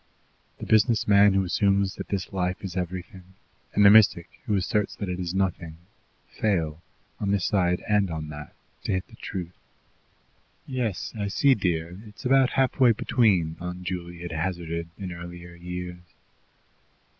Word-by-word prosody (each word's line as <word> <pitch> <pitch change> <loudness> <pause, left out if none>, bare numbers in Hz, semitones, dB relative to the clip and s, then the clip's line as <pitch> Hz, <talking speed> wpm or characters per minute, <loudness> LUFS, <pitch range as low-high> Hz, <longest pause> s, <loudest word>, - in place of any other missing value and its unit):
The - - -7
business 110 +1 +3
man 100 -1 +6
who 95 - +3
assumes 100 +2 +1
that - - -7
this 95 -2 -3
life 90 0 -2
is 95 -2 -5
everything, 90 +1 -6 0.4
and 105 - +5
the 100 - +10
mystic 105 -6 +6 0.2
who 105 - +2
asserts 100 +2 0
that 100 - -4
it 90 0 -3
is 90 0 -3
nothing, 85 -4 -1 0.5
fail, 85 -7 -1 0.4
on 100 - -1
this 100 -3 +1
side 90 -3 +1
and 105 -2 +2
on 80 -2 -5
that, 75 -1 -9 0.3
to - - 0
hit 95 0 -2
the - - -14
truth. 90 -2 -6 1.1
"Yes, 120 -8 -3
I 100 -2 -2
see, 135 +8 +4
dear; 90 -4 -2
it's 105 +2 -13
about 135 0 +4
halfway 130 -2 +4
between," 95 -9 +2
Aunt 90 +1 -6
Juley 85 -1 -5
had 85 - -6
hazarded 85 0 -3
in 95 -2 -5
earlier 85 0 -9
years. 90 0 -7
90 Hz, 155 wpm, -26 LUFS, 85-100 Hz, 1.1 s, the